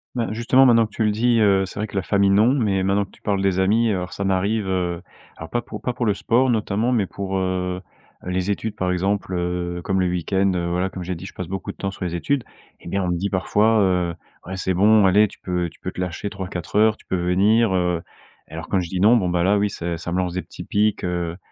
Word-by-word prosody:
Ben, 115 -3 -1
justement 120 +4 +4
maintenant 115 -3 +5
que - - -28
tu 110 - 0
le 105 - +3
dis, 115 +2 +2
heu, 100 -3 +4
c'est 95 - -8
vrai 105 - -1
que 100 - -12
la 100 - +1
famille 100 +1 +2
non, 105 +5 +4
mais 105 -8 +1
maintenant 100 +1 +1
que - - -23
tu - - -21
parles 100 -2 0
des 95 -1 +1
amis, 110 +5 +3
heu, - - +1
alors 90 -1 -4
ça 100 - -4
m'arrive, 100 +2 0
heu, 90 -2 -1 0.4
alors 80 - -8
pas 120 - -1
pour 120 - -9
pas 125 - -2
pour 120 - -2
le 105 - +3
sport 125 +6 +2
notamment, 110 +1 0
mais 115 -5 +2
pour, 95 0 -4
heu, 90 -1 -2 0.4
les 90 +2 -1
études 105 +1 -3
par 90 -3 -1
exemple, 95 +1 -1
heu, 90 0 -2
comme 95 -1 +1
le 90 - +1
week-end, 95 +2 0
heu, 85 -1 -1
voilà 90 +2 0
comme 95 - -7
j'ai 90 +1 -3
dit 85 - -9
je - - -9
passe 90 - -6
beaucoup 95 +1 -5
de - - -20
temps 95 - -3
sur 95 - -8
les 90 -2 -3
études, 130 +10 -1 0.4
et - - -9
bien 100 +3 -1
on - - -2
me 90 - 0
dit 95 +4 -2
parfois, 105 +4 +2
heu, 90 -3 +1 0.3
ouais, 95 +2 -6
c'est 95 0 -1
bon 105 +3 +5
allez, 105 +3 +5
tu - - -16
peux 90 -2 -2
tu 80 - -22
peux 90 - -5
te - - -5
lâcher 90 +3 -3
3-4 95 -4 -6
heures 110 +1 +4
tu - - -22
peux - - -2
venir, 95 +5 +3
heu, 90 -2 0 0.5
et - - -19
alors 80 +1 -7
quand 95 - +1
je 85 - -6
dis: 95 - -3
«Non», 110 +6 +6
bon, 95 -5 0
bah, 90 -1 +1
là 100 +3 +3
oui 100 0 +1
ç 85 -2 -4
ça 85 +1 -6
me 90 - -1
lance 90 -2 -1
des 90 - -2
petits - - -10
piques, 105 -1 +1
heu, 85 -1 -2
95 Hz, 275 wpm, -22 LUFS, 90-105 Hz, 0.5 s, Non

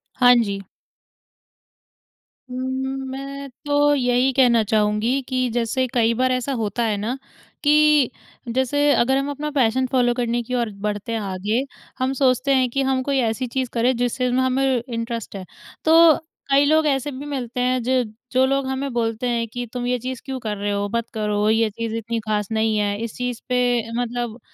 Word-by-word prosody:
हाँ 245 -1 +6
जी। 200 -4 0 1.9
उम्म, 260 +1 -3 0.2
मैं 275 +1 -6 0.2
तो 290 0 +3
यही 250 0 +2
कहना 245 -4 +4
चाहूँगी 215 +5 +1
कि 255 -1 0
जैसे 240 +2 0
कई 230 -1 +3
बार 255 +2 +1
ऐसा 255 +2 -1
होता 215 +2 -1
है 210 -2 0
ना 230 +6 -3 0.5
कि 300 -3 +4 0.4
जैसे 260 +2 0
अगर 260 +3 +3
हम 275 +1 -1
अपना 300 +1 -4
पैशन 260 -2 +2
फॉलो 245 -2 +3
करने 240 -1 -1
की 255 - -6
और 235 -2 0 0.2
बढ़ते 210 +1 -3
हैं 225 - -1
आगे 205 +4 -1 0.4
हम 260 +1 0
सोचते 265 0 +2
हैं 260 -2 +3
कि 275 +3 -1
हम 260 -1 +1
कोई 275 0 0
ऐसी 250 +3 -3
चीज़ 255 +1 -2
करें 245 +2 +2
जिस 245 0 -1
चीज़ 250 -1 0
में 255 - +2
हमें 260 -1 +1
इंटरेस्ट 230 -3 -4
है। 190 -1 -6 0.4
तो 325 0 +7 0.4
कई 280 +1 +5
लोग 315 +1 +3
ऐसे 275 +1 0
भी 270 +2 -7
मिलते 255 -4 -4
हैं 255 0 +1
ज 255 +1 +2 0.3
जो 260 +1 +4
लोग 275 0 0
हमें 265 +1 -2
बोलते 230 0 -1
हैं 235 -1 -1
कि 245 +2 -5
तुम 245 -1 -3
ये 250 - +1
चीज़ 255 +1 -5
क्यों 265 -1 -4
कर 215 -4 -3
रहे 205 +1 -2
हो 200 0 -1
मत 235 0 -2
करो 210 -1 0
ये 225 0 +3
चीज़ 225 +1 -5
इतनी 230 +1 -3
ख़ास 210 -2 -2
नहीं 220 0 +1
है 205 -1 0
इस 230 - -5
चीज़ 245 -2 -3
पे 250 - +1 0.4
मतलब 240 -1 -4
250 Hz, 190 wpm, -22 LUFS, 225-265 Hz, 1.9 s, तो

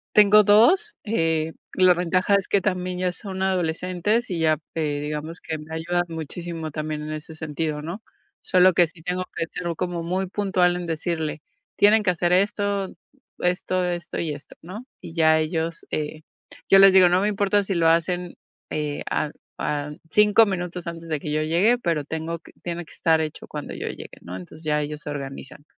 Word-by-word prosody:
Tengo 210 0 +8
2, 325 - +4
eh, 165 -6 0 0.2
la 185 -1 +6
ventaja 180 +3 +1
es 200 -1 +1
que 200 - +3
también 180 -2 -2
ya 180 -1 0
son 190 -1 -6
adolescentes, 185 +5 0
y 175 -3 -3
ya, 155 -2 +3 0.2
eh, 150 -3 -1
digamos, 150 +3 -5
que 160 - -4
me 155 +1 -10
ayudan 175 +2 0
muchísimo 165 0 -5
también 155 0 -4
en 155 0 -5
ese 155 +1 -7
sentido, 155 -1 -3
¿no? 170 +8 -6 0.4
Solo 185 0 +5
que 175 -1 +4
sí 160 +1 -17
tengo 180 +1 -2
que 165 - -1
ser 175 +1 -5
como 175 -2 -2
muy 185 +3 -1
puntual 185 -2 +1
en 180 -1 -4
decirle: 160 -2 -3 0.3
"Tienen 210 +2 +5
que 185 - +2
hacer 175 0 0
esto, 200 0 +1 0.5
esto, 180 +1 0
esto 175 -1 -3
y 160 -3 -1
esto", 145 - -13
¿no? 200 +9 -8 0.2
Y 165 - -10
ya 160 -1 +4
ellos 160 +1 -2
eh, 155 +1 -3 0.5
yo 195 - +8
les 195 -1 +9
digo: 185 -2 +7
"No 180 +1 +3
me 205 - +1
importa 205 0 +2
si 195 -1 -2
lo 165 -1 +3
hacen, 175 +2 +1 0.4
eh, 150 -1 -2
a 150 - -1 0.3
a 145 0 -2 0.2
5 210 +1 +6
minutos 180 -2 -4
antes 165 0 -7
de 150 -2 -1
que 150 - -5
yo 155 +1 0
llegue, 180 +10 +3
pero 170 -9 0
tengo 160 +2 -4
que - - -17
tiene 175 0 -4
que - - -16
estar 160 -1 +2
hecho 155 -1 -4
cuando - - -6
yo - - -5
llegue, - - -9
¿no? 90 +1 -8
Entonces 125 - -10
ya 150 -1 +1
ellos 150 0 -4
se 150 - -5
organizan. 140 0 -7
170 Hz, 195 wpm, -24 LUFS, 155-185 Hz, 0.5 s, les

